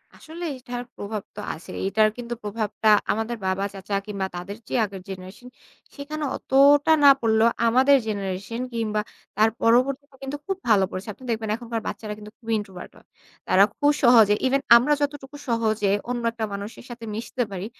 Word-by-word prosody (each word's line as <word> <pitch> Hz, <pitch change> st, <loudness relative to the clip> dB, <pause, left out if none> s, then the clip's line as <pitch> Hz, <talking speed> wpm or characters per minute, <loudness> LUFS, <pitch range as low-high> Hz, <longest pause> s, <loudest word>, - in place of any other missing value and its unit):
আসলে 330 Hz, +2 st, -10 dB
এটার 245 Hz, 0 st, -6 dB
প্রভাব 205 Hz, 0 st, -5 dB
তো -, -, -8 dB
আছেই। 160 Hz, -, -9 dB
এটার 215 Hz, +2 st, +3 dB
কিন্তু 240 Hz, 0 st, -5 dB
প্রভাবটা 215 Hz, +1 st, -1 dB, 0.2 s
আমাদের 225 Hz, +2 st, -2 dB
বাবা 190 Hz, +1 st, 0 dB
চাচা 200 Hz, +1 st, -4 dB
কিংবা 200 Hz, -2 st, -3 dB
তাদের 195 Hz, +4 st, -6 dB
যে -, -, -3 dB
আগের 195 Hz, -2 st, -9 dB
জেনারেশন 190 Hz, +6 st, -9 dB, 0.5 s
সেখানে 300 Hz, +1 st, -5 dB
অতটা 285 Hz, +3 st, +4 dB
না 280 Hz, -, +10 dB
পড়লেও 225 Hz, 0 st, +4 dB, 0.2 s
আমাদের 265 Hz, +4 st, +5 dB
জেনারেশন 200 Hz, +3 st, -3 dB
কিংবা 215 Hz, -2 st, -1 dB, 0.4 s
তার 220 Hz, +1 st, +5 dB
পরবর্তীতে 265 Hz, +4 st, +2 dB
কিন্তু 275 Hz, +2 st, -4 dB
খুব 385 Hz, -1 st, -1 dB
ভালো 200 Hz, -3 st, +5 dB
পড়েছে। 185 Hz, +4 st, -6 dB
আপনি 260 Hz, -, -18 dB
দেখবেন 220 Hz, -1 st, -2 dB
এখনকার 230 Hz, -1 st, -5 dB
বাচ্চারা 210 Hz, -1 st, -5 dB
কিন্তু 210 Hz, 0 st, -11 dB
খুবই 230 Hz, -2 st, -4 dB
ইন্ট্রোভার্ট 190 Hz, -3 st, -9 dB
হয়। -, -, -21 dB, 0.4 s
তারা 195 Hz, -, +6 dB
খু 290 Hz, -, -3 dB, 0.2 s
সহজে 225 Hz, -4 st, +7 dB
ইভেন 275 Hz, +1 st, +1 dB, 0.2 s
আমরা 290 Hz, +5 st, +2 dB
যতটুকু 285 Hz, -1 st, -3 dB
সহজে 220 Hz, -3 st, +1 dB, 0.2 s
অন্য 240 Hz, -1 st, -2 dB
একটা 225 Hz, -1 st, -3 dB
মানুষের 200 Hz, +4 st, -7 dB
সাথে 230 Hz, -1 st, -8 dB
মিশতে 240 Hz, +2 st, -3 dB
পারি, 190 Hz, +1 st, -5 dB
225 Hz, 170 wpm, -24 LUFS, 205-255 Hz, 0.5 s, না